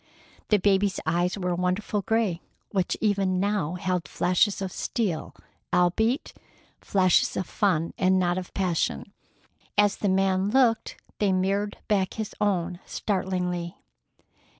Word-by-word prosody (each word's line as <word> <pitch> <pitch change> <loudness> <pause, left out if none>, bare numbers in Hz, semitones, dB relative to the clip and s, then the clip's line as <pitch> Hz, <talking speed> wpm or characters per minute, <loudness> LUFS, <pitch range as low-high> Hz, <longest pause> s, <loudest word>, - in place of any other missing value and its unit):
The 210 - +5
baby's 195 0 +2
eyes 175 +4 0
were 180 -2 -1
a - - 0
wonderful 180 +4 -1
gray, 210 -5 0 0.3
which 190 -3 0
even 195 -3 +1
now 195 -5 0
held 180 -3 -2
flashes 180 +6 +1
of 190 -1 -3
steel—albeit 220 - -1 0.5
flashes 185 -3 +2
of 185 - -1
fun 170 -6 0
and 185 0 +3
not 180 0 +1
of 180 - -9
passion. 185 +1 -1 0.6
As 205 -1 +4
the 205 - 0
man 190 0 +2
looked, 240 -1 +2 0.2
they 205 -2 +2
mirrored 195 +2 0
back 195 -3 +1
his 220 -2 -4
own 180 -4 0
startlingly. 180 -3 -2
190 Hz, 125 wpm, -26 LUFS, 180-205 Hz, 0.6 s, The